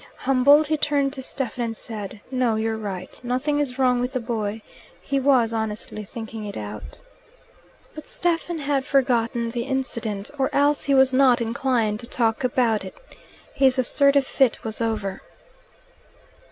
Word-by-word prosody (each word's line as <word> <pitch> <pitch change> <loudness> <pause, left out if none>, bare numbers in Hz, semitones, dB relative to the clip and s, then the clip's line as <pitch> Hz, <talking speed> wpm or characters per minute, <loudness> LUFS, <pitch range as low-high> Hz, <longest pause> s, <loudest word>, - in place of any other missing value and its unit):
Humbled, 275 +4 +4
he 310 +1 0
turned 285 -2 +1
to 270 - -6
Stephen 255 -2 -4
and 225 -1 -3
said, 210 -2 -7
"No, 250 -3 +1
you're 220 0 -1
right. 195 -4 -6
Nothing 260 +4 0
is 265 -3 -2
wrong 250 -2 +3
with 250 +2 -2
the 255 - 0
boy. 220 -2 -3 0.4
He 275 -1 -1
was 255 -4 +3
honestly 215 -1 -4
thinking 220 +1 -7
it 205 -1 -6
out." 105 0 -7 1.0
But 310 - -10
Stephen 345 0 -1
had 280 -2 0
forgotten 235 -4 +1
the 235 0 -3
incident, 230 -6 -3
or 265 - +2
else 285 +1 +2
he 280 - +3
was 265 0 +5
not 255 -2 +5
inclined 230 -2 0
to 235 - -8
talk 230 +1 0
about 240 -3 +1
it. - - -9 0.6
His 265 -2 +3
assertive 280 +2 +3
fit 265 -3 +1
was 220 +1 -5
over. 210 -4 -2
250 Hz, 155 wpm, -23 LUFS, 225-270 Hz, 1.0 s, was